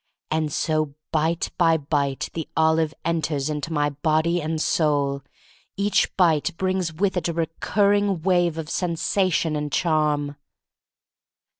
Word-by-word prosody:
And 155 -1 0
so, 155 -1 -1 0.2
bite 160 +2 0
by 165 -2 +4
bite, 140 -2 -1
the 160 -2 -5
olive 160 -1 +3
enters 155 -3 -1
into 150 +2 -4
my 145 -2 +1
body 160 +4 +1
and 155 +1 -2
soul. 145 -3 +1 0.6
Each 200 +1 +2
bite 170 -2 +2
brings 185 -2 0
with 190 +4 -1
it 175 - 0
a - - -2
recurring 200 +3 +1
wave 175 -3 +2
of 160 -2 -4
sen 170 +1 -1
sation 170 -3 +1
and 150 -1 -3
charm. 150 -3 +1
160 Hz, 135 wpm, -23 LUFS, 150-175 Hz, 0.6 s, by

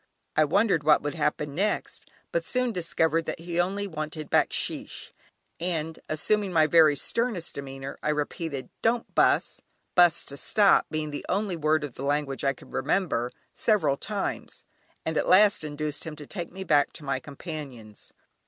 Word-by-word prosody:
I 155 - +5
wondered 195 0 +2
what 150 0 +5
would 145 - -2
happen 150 -2 -1
next, 200 +7 -2 0.2
but - - 0
soon 250 -1 0
discovered 165 -3 0
that - - -3
he 170 0 -3
only 195 +3 0
wanted 155 -3 -5
"Backsheesh," - - 0 0.5
and 165 -2 -3
assuming 200 +6 0
my 160 -3 +4
very 155 -1 +6
sternest 220 - -1
demeanour 135 -1 -7
I - - -1
repeated 150 -1 -3
"don't 230 +1 0
bus" - - +2 0.3
("bus" 175 -2 +5
to 140 - -8
stop, 200 +6 +4
being 155 -1 -3
the 145 - -5
only 195 -1 0
word 155 -1 +1
of 145 -4 -5
the 135 - -8
language 145 -1 -1
I 135 0 +2
could - - -16
remember) 140 -5 0 0.2
several 170 -11 +2
times, 200 +6 -4 0.4
and 160 -1 -1
at - - 0
last 200 -1 +6
induced 150 0 -4
him 160 -2 -6
to 150 -1 -10
take 175 +1 -6
me 190 +2 -6
back 150 -5 +3
to 155 - -7
my 135 -2 -1
companions. 140 - -9
155 Hz, 165 wpm, -27 LUFS, 145-185 Hz, 0.5 s, very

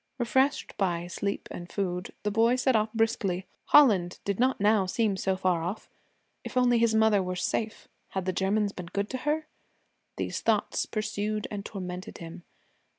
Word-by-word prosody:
Refreshed 265 +3 +1
by 175 -3 0
sleep 200 +3 -3
and 175 0 -8
food, 180 -2 -2
the 210 - 0
boy 230 +3 +4
set 255 0 +2
off 215 0 +2
briskly. 200 -5 0 0.2
Holland 200 -12 +5
did 200 0 -1
not 260 +2 +2
now 205 -1 +3
seem 210 +1 +1
so 190 0 -1
far 180 -3 +1
off. 180 +6 -5 0.5
If - - -5
only 245 -2 +4
his 230 -1 +3
mother 220 -2 +4
were 180 0 -3
safe! 220 +4 -2 0.2
Had 190 -2 -3
the 185 - 0
Germans 200 +3 +1
been 180 -3 -8
good 200 +4 -3
to 260 - -3
her? 310 +1 0 0.7
These - - -3
thoughts - - +1
pursued 215 0 -2
and 205 -1 -4
tormented 185 -3 -6
him. 170 +1 -9
205 Hz, 170 wpm, -28 LUFS, 185-225 Hz, 0.7 s, Holland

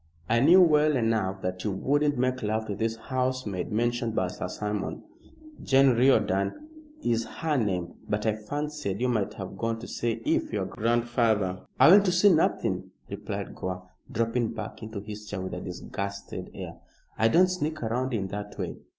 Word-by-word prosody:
I 115 - +3
knew 175 +8 +7
well 150 -2 +4
enough 110 -5 0
that 90 0 -3
you 105 - 0
wouldn't 145 +9 +1
make 130 +1 0
love 110 0 -1
to 105 - -4
this 115 +2 -1
housemaid 125 -6 -2
mentioned 120 +1 0
by 95 -1 +1
Sir 90 - -5
Simon 105 +1 -4 0.6
Jane 135 0 +5
Riordan 110 - +2 0.3
is 115 -1 +1
her 160 -2 -2
name. 95 -8 -1 0.2
But 105 +1 -1
I 110 - +3
fancied 145 -1 -4
you 125 - +1
might 110 -5 0
have 95 -1 -7
gone 115 +2 -1
to 120 - -8
see 120 -1 -1
if - - +1
your - - -1
grandfather 115 -5 0
" - - -34
"I - - +8
went 200 +1 +8
to 185 - +3
see 185 +2 +5
nothing," 160 - +1 0.2
replied - - -5
Gore, 90 0 -6 0.2
dropping 115 +1 0
back 110 0 -6
into 110 -2 -6
his 105 0 -8
chair 100 - -4
with 95 0 -5
a 90 - -4
disgusted 100 +2 -6
air. - - -7 0.4
"I 110 - +3
don't 175 +11 +5
sneak 155 -4 -2
round 125 +4 -1
in 105 -5 -1
that 105 +1 -6
way. - - -4
115 Hz, 180 wpm, -27 LUFS, 100-130 Hz, 0.6 s, I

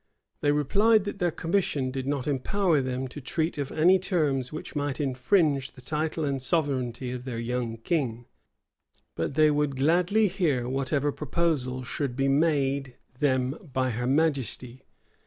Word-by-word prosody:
[*] - - -51
They 145 - +3
replied 200 +10 +3
that 205 - -5
their 175 - +2
commission 165 -6 -1
did 130 0 -4
not 140 -2 -1
empower 155 +4 +1
them 130 0 -3
to 145 - -8
treat 160 +4 -2
of 140 - -3
any 180 +4 +4
terms 150 -9 0
which 155 - -7
might 145 -1 -2
infringe 140 +1 +1
the 130 - -14
title 155 +3 -2
and 135 -2 -1
sovereignty 130 -5 -1
of 125 -1 -5
their 125 -3 -5
young 115 0 -2
king; 120 -3 -2 0.9
but 85 +11 -2
they 155 0 +5
would 145 -1 0
gladly 175 +10 +3
hear 145 -11 0
whatever 135 +2 0
proposals 135 -4 -1
should 140 -5 -3
be 135 +1 +1
made 140 -3 +1 0.2
them 130 -3 +2 0.2
by 130 -1 +1
her 125 +2 -2
majesty. 135 -4 0
140 Hz, 155 wpm, -27 LUFS, 130-160 Hz, 0.9 s, they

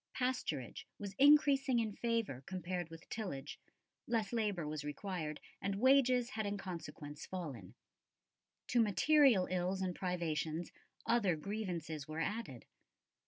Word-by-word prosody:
Pasturage 250 - -2
was 200 -1 -6
increasing 280 -2 +6
in 220 -3 0
favour 230 - -1
compared 180 -2 -3
with 165 0 -11
tillage; 185 -12 -5 0.5
less 225 -2 0
labour 205 -8 0
was 150 -1 -4
required, 155 0 -4 0.2
and 200 0 -1
wages 255 -1 +4
had 220 - -2
in 200 0 -2
consequence 165 -6 -7
fallen. 140 - -6 0.9
To 240 - +4
material 230 -1 +5
ills 185 +1 0
and 185 -1 -1
privations, 170 -2 -2 0.3
other 210 -7 +3
grievances 165 -5 -4
were 155 +1 -4
added. 165 - -3
190 Hz, 120 wpm, -36 LUFS, 160-230 Hz, 0.9 s, increasing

